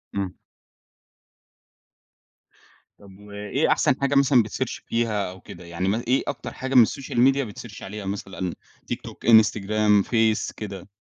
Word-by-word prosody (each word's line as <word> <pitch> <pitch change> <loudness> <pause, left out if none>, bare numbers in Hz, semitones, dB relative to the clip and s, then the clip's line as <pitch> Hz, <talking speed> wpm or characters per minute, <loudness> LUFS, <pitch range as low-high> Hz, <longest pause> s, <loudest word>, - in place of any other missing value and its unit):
إمم. 95 -2 -3 2.6
طَب 100 -1 -16
وإيه 105 +7 -2
أحسن 130 - +3
حاجة 140 0 +1
مثلًا 135 -4 +5
بتsearch 120 +3 -4
فيها 110 -4 -1
أو 95 - -13
كده 85 +1 -12
يعني 85 +2 -3
مثلًا 110 +4 -2
إيه 130 +2 +2
أكتر 145 - -5
حاجة 130 +1 -4
من 120 -3 +9
الSocial 135 +3 -7
Media 130 -3 +3
بتsearch 110 -4 -10
عليها 100 +1 -7
مثلًا؟ 95 -2 -4 0.4
TikTok - - -8
،Instagram 105 -2 +4
،Face 110 -2 +1
كده؟ 100 -2 -7
105 Hz, 135 wpm, -24 LUFS, 100-120 Hz, 2.6 s, من